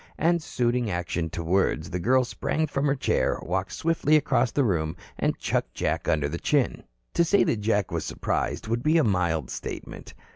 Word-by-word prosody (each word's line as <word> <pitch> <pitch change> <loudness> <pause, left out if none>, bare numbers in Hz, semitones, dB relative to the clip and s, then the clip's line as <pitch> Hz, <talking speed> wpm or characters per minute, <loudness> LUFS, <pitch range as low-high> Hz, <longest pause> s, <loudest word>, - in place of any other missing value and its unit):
And 170 +2 +2
suiting 120 -5 0
action 85 -2 -2
to 85 - -5
words, 85 -2 +1
the 90 - -2
girl 130 +8 +3
sprang 155 +5 -1
from 145 -1 -1
her 140 - +2
chair, 130 - +1
walked 95 +2 -2
swiftly 160 -2 +2
across 130 -4 +3
the 140 - +1
room 85 -7 0 0.2
and - - 0
chucked - - -2
Jack - - -1
under 75 -2 +2
the 85 +4 -4
chin. 145 -4 0 0.3
To 170 - +3
say 200 +4 +4
that 110 - 0
Jack 105 -2 +1
was - - -2
surprised - - -2
would 115 +2 0
be 155 +4 +3
a 160 - +4
mild 85 - 0
statement. - - -7
115 Hz, 190 wpm, -26 LUFS, 85-145 Hz, 0.3 s, say